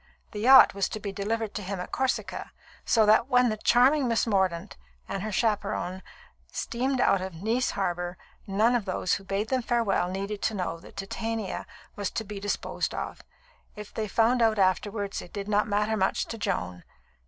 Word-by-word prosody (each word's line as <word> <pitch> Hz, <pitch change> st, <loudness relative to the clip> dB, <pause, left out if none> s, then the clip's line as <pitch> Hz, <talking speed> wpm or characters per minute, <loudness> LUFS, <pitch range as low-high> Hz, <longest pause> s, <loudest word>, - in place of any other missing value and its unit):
The 210 Hz, -, -6 dB
yacht 260 Hz, +5 st, +8 dB
was 200 Hz, -1 st, 0 dB
to 215 Hz, -, -5 dB
be 200 Hz, -1 st, -4 dB
delivered 215 Hz, +2 st, -2 dB
to 210 Hz, -, -4 dB
him 195 Hz, 0 st, -4 dB
at 180 Hz, -, -6 dB
Corsica, 265 Hz, -1 st, -2 dB, 0.3 s
so 225 Hz, -2 st, +4 dB
that 215 Hz, +3 st, +5 dB
when 250 Hz, -2 st, +4 dB
the 215 Hz, -, -2 dB
charming 255 Hz, +5 st, +4 dB
Miss 230 Hz, -1 st, +2 dB
Mordaunt 190 Hz, -6 st, 0 dB, 0.3 s
and 195 Hz, -, -3 dB
her 215 Hz, +2 st, -3 dB
chaperon 205 Hz, -3 st, -1 dB, 0.5 s
steamed 260 Hz, +2 st, -1 dB
out 195 Hz, -5 st, +3 dB
of 190 Hz, -2 st, -5 dB
Nice 235 Hz, +4 st, +1 dB
Harbour, 175 Hz, -2 st, -2 dB, 0.3 s
none 215 Hz, +5 st, +3 dB
of 240 Hz, -5 st, 0 dB
those 185 Hz, -1 st, -1 dB
who 195 Hz, -, -2 dB
bade 195 Hz, +3 st, -2 dB
them 260 Hz, -1 st, +1 dB
farewell 230 Hz, -7 st, +1 dB
needed 200 Hz, +2 st, -4 dB
to 220 Hz, -, 0 dB
know 165 Hz, -3 st, -3 dB
that -, -, -15 dB
Titania 220 Hz, +1 st, -4 dB, 0.3 s
was 205 Hz, -2 st, -2 dB
to 225 Hz, -, -3 dB
be 205 Hz, -1 st, -7 dB
disposed 205 Hz, +1 st, -2 dB
of. -, -, -5 dB, 0.5 s
If 210 Hz, -1 st, -9 dB
they 220 Hz, -1 st, -2 dB
found 235 Hz, +4 st, +2 dB
out 220 Hz, -1 st, +3 dB
afterwards, 200 Hz, +1 st, 0 dB
it 175 Hz, -, -12 dB
did 200 Hz, 0 st, -5 dB
not 210 Hz, 0 st, +2 dB
matter 210 Hz, +1 st, +1 dB
much 190 Hz, -2 st, +1 dB
to 230 Hz, -, -5 dB
Joan. 90 Hz, -, -2 dB
210 Hz, 190 wpm, -27 LUFS, 195-225 Hz, 0.5 s, yacht